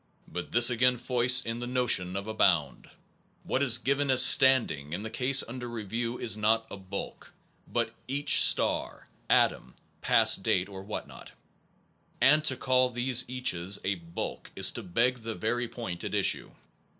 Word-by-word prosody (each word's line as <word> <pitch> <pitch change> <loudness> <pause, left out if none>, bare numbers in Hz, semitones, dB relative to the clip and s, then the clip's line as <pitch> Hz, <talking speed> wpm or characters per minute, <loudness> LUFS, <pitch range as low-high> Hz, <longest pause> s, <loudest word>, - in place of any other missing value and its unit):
But 90 +1 -8
this 120 +1 +5
again 125 +1 +1
foists 125 0 +2
in 115 +1 -5
the 120 - -6
notion 120 -8 +1
of 100 +1 -5
a 110 - -6
bound. - - -1 0.5
What 130 - -3
is 125 -4 +5
given 140 +2 -2
as 130 -1 +7
standing 115 - +3
in 95 +4 -5
the 110 - -8
cases 130 +2 +2
under 120 +1 -8
review 115 +2 -5
is 110 - 0
not 110 +1 0
a - - -7
bulk/ 95 +1 -9 0.4
but - - -3
each 140 +3 +2
star, - - +2 0.2
atom, - - 0 0.3
past - - +4
date 90 +2 -1
or 95 -1 -10
what 105 +2 -7
not; - - -14 0.9
and 150 +3 +3
to 130 -3 +2
call 130 0 +1
these 125 0 +1
caches 100 -7 -1
a 95 - -1
bulk/ 85 -2 -8
is - - +2
to - - -8
beg 120 +7 -1
the 115 -1 -7
very 120 +5 -3
point 115 -7 -8
at - - -5
issue. - - +1
120 Hz, 170 wpm, -27 LUFS, 100-125 Hz, 0.9 s, as